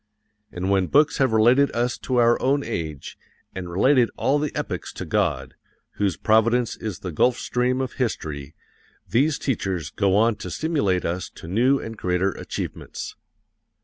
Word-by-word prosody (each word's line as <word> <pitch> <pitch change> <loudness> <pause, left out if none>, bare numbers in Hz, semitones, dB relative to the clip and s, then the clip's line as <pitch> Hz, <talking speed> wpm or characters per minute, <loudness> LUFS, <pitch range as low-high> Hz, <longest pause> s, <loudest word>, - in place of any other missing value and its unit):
And 90 +2 -2
when 95 -2 +2
books 150 - +3
have 135 -3 +3
related 120 +6 +4
us 120 +1 0
to 130 - -2
our 120 -1 +4
own 140 +2 +2
age, 80 - -5 0.3
and 90 -2 -6
related 120 +7 +3
all 145 +2 +2
the 150 -1 -2
epochs - - -4
to - - -6
God, - - -1 0.4
whose 100 -7 0
providence 115 - +2
is 105 -4 -6
the 90 - -4
gulf 125 +10 +2
stream 125 +1 0
of 130 - -3
history, 75 - -3 0.5
these 145 +5 +2
teachers 95 - -2
go 100 -2 +1
on 110 +1 +3
to - - -7
stimulate 125 - 0
us 90 +2 -3
to - - -10
new 120 +9 +3
and 115 0 -7
greater 90 +1 0
achievements. - - -6
115 Hz, 160 wpm, -23 LUFS, 95-130 Hz, 0.5 s, related